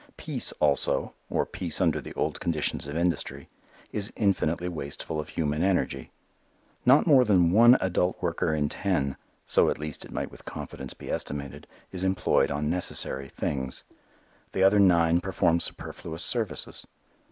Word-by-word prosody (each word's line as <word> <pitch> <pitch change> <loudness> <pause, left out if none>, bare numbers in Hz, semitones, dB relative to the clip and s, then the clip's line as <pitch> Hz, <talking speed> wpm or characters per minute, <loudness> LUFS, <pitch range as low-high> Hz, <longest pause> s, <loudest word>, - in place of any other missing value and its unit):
Peace, - - +2
also 70 -2 +2 0.2
or - - 0
peace 85 -3 0
under 80 -5 +2
the - - -10
old - - -2
conditions 75 -4 -2
of 75 +2 -4
industry 85 -5 -2 0.4
is 105 -1 -3
infinitely 90 -4 0
wasteful 75 -1 -5
of 75 - -5
human 75 -1 -1
energy. 90 -8 0 0.8
Not 135 +4 +6
more 140 -6 +6
than 90 -7 +3
one 120 +5 +7
adult 90 0 0
worker 85 -2 -1
in 75 -1 +1
ten 75 -6 -1 0.3
so - - +4
at - - -1
least 75 -1 -6
it - - -12
might - - -4
with - - -14
confidence 65 -1 -7
be - - -8
estimated 70 -2 -4 0.2
is 95 -1 -5
employed 95 0 +2
on 75 +1 -2
necessary 70 -5 -1
things. 65 -1 -3 0.7
The 95 - +1
other 100 +2 +5
nine 85 -3 +4
perform 85 -3 +1
superfluous 80 0 -5
services. 110 -10 -3
85 Hz, 150 wpm, -27 LUFS, 75-95 Hz, 0.8 s, one